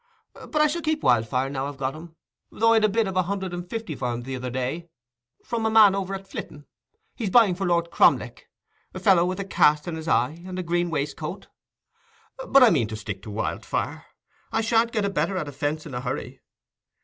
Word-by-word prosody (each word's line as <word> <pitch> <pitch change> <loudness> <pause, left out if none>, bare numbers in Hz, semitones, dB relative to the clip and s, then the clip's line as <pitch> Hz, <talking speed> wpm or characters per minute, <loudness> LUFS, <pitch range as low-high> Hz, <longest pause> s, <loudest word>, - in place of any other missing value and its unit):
But - - -12
I 305 0 +5
shall 320 +3 -1
keep 310 -1 -1
Wildfire, 125 +3 +2
now 135 0 -2
I've 145 -1 -8
got 135 -1 -2
him, 160 +1 -11 0.3
though 230 +1 +3
I'd 220 -1 +3
a 215 - +4
bid 220 +1 +1
of 190 - -4
a 185 - +4
hundred 190 0 -3
and 175 0 -6
fifty 220 -8 -4
for 125 -3 -2
him 120 0 -4
the 130 +1 -5
other 125 0 -4
day, 130 +7 -4 0.6
from 230 -1 -2
a 220 - +2
man 215 -3 +7
over 195 0 -2
at 195 0 -9
Flitton—he's 240 - -9
buying 220 -2 +5
for 190 +1 -3
Lord 170 -1 +1
Cromleck—a - - -1
fellow 185 -5 +4
with 185 +2 -3
a 195 - -3
cast 150 -4 +3
in 170 - -3
his 160 0 -7
eye, 150 +3 +1
and 185 0 -7
a 185 - -2
green 175 0 0
waistcoat. 150 -2 -4 1.0
But 275 -1 +6
I 240 - +7
mean 130 -10 +2
to 110 - -6
stick 100 -2 -6
to 110 - -10
Wildfire: 105 +2 -3 0.5
I 225 - +1
shan't 230 +1 +2
get 215 -3 0
a - - 0
better 175 +3 -1
at 155 - -3
a - - -6
fence 145 +3 -3
in 150 - -9
a 125 - -3
hurry. 130 0 -5
175 Hz, 220 wpm, -25 LUFS, 140-205 Hz, 1.0 s, man